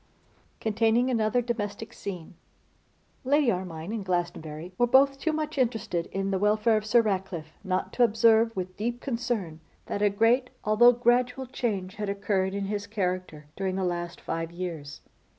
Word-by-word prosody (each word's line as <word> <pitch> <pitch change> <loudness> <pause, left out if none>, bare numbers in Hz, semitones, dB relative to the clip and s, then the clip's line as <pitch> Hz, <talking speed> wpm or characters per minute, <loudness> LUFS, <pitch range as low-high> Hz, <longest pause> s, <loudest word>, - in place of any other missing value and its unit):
Containing 225 +3 +2
Another 230 +1 +1
Domestic 225 -1 -4
Scene. 180 -5 -7 0.9
LADY 280 -1 +3
ARMINE 180 -1 -4
and 220 -3 -3
Glastonbury 175 -2 -3
were 245 - +4
both 275 +2 +4
too 320 - 0
much 310 -2 -3
interested 220 -8 0
in 195 0 -2
the 190 - 0
welfare 210 +2 +3
of 215 0 -1
Sir 235 +2 +5
Ratcliffe 185 -6 -3
not 185 -1 -2
to 245 - +3
observe 225 0 +4
with 185 -1 -4
deep 240 +3 -2
concern 230 - -3 0.3
that 205 - -3
a 205 - +4
great, 230 +5 +2
although 220 +3 +6
gradual, 245 +2 +1
change 205 -6 -3
had 210 -1 -3
occurred 200 -1 0
in 200 0 -2
his 205 0 -3
character 185 -7 -3
during 190 -1 -2
the 190 - -1
last 175 -1 -3
five 165 0 -4
years. 170 -5 -6
210 Hz, 160 wpm, -27 LUFS, 185-235 Hz, 0.9 s, although